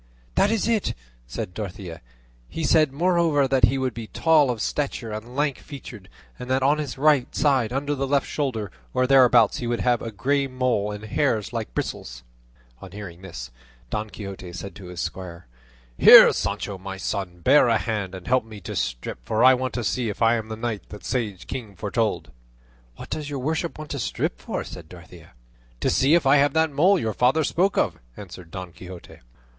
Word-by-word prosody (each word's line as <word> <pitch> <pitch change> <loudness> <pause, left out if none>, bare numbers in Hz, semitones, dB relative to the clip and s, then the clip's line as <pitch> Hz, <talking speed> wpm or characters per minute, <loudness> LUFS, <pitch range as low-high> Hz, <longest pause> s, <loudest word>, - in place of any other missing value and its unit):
"That 200 - +3
is 225 -1 0
it," 225 -3 0 0.3
said 90 +8 -5
Dorothea; 90 -4 -7 0.5
"he 165 - -5
said, 155 -1 +4
moreover, 165 -2 +2
that 130 -2 +4
he 135 +4 0
would 130 -2 -1
be 115 0 -7
tall 155 -1 +3
of 120 -3 -2
stature 130 -3 -2
and 110 +4 -7
lank 145 -1 0
featured; 120 -8 -11 0.3
and 125 - -7
that 130 0 +1
on 145 +3 +3
his 145 -4 -4
right 145 -2 +2
side 135 -6 +2
under 140 +3 -1
the 135 -1 -2
left 140 0 +1
shoulder, 115 - -3 0.2
or 130 - +3
thereabouts, 125 -4 +5
he 120 - -4
would 120 0 -1
have 120 -2 +2
a 115 - -4
grey 135 +6 0
mole 125 -5 0
with 105 0 -6
hairs 110 -4 -1
like - - -5
bristles." - - -5 0.6
On 95 - -10
hearing 95 -4 -9
this, 60 -11 -8 0.4
Don 105 +1 -3
Quixote 100 -4 -8
said 95 +3 -7
to 100 - -11
his 90 -1 -8
squire, 90 -2 -6 0.5
"Here, - - +10
Sancho 100 -2 -3
my 95 0 -7
son, 90 -2 -4
bear 130 - +5
a 115 -1 +3
hand 100 -2 -3
and 95 - -10
help 130 -1 +2
me 110 -2 -11
to - - -6
strip, - - -3
for 110 +1 0
I 130 +1 +8
want 130 0 -2
to 120 - -2
see 120 0 -1
if 105 - -6
I 115 +1 +5
am 110 -2 -2
the 110 - -5
knight 110 -2 -4
that 105 - -10
sage 110 -6 -3
king 115 -7 -7
foretold." 110 - -2 0.6
"What - - -11
does 150 -1 -4
your 145 - -4
worship 160 +5 -2
want 155 -1 -8
to 140 - -3
strip - - -2
for?" - - -4
said 80 -3 -10
Dorothea. 85 -2 -14 0.5
"To - - +1
see 140 +5 +4
if 170 - +2
I 135 +2 +6
have 140 0 +3
that 160 -1 +2
mole 180 +8 +4
your 110 -9 -2
father 130 +9 +2
spoke 185 +6 +1
of," - - 0 0.2
answered 90 -3 -10
Don 90 0 -7
Quixote. 90 0 -12
120 Hz, 200 wpm, -24 LUFS, 100-140 Hz, 0.6 s, Here